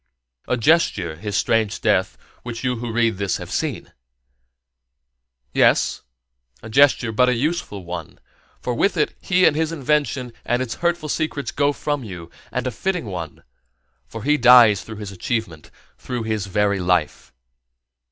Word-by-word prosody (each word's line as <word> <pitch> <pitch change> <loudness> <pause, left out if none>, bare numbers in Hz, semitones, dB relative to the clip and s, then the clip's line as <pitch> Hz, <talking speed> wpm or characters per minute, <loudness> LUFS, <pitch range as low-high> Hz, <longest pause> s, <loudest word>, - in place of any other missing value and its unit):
A 125 - 0
gesture, 110 - +2
his 105 +3 -3
strange 110 -2 +1
death, - - +1 0.2
which 120 -1 -7
you 125 -1 0
who 120 0 -4
read 115 -2 +1
this 100 -2 0
have - - -9
seen? - - -3 1.6
Yes, - - +3 0.6
but 125 0 +3
a 125 - +2
useful 125 - -2
one, 85 -2 -7 0.4
for 125 - -3
with 190 - +1
it 150 - +1
he 185 -1 +3
and 150 - +4
his 160 +1 0
invention 140 -4 -1
and 120 +1 0
its 130 -3 -3
hurtful 170 -2 0
secrets 145 -1 -2
go 145 0 +2
from 145 -1 -3
you; 90 -6 -9 0.2
and - - -2
a 130 - -1
fitting 180 - -2
one, 85 -7 -7 0.6
for 115 - -8
he 150 +3 +3
dies 120 -5 +7
through 110 - -9
his 105 -2 -7
achievement, 95 - -4 0.3
through 125 -2 -4
his 110 -3 -2
very 100 +1 +1
life. 90 -4 0
120 Hz, 150 wpm, -21 LUFS, 100-145 Hz, 1.6 s, dies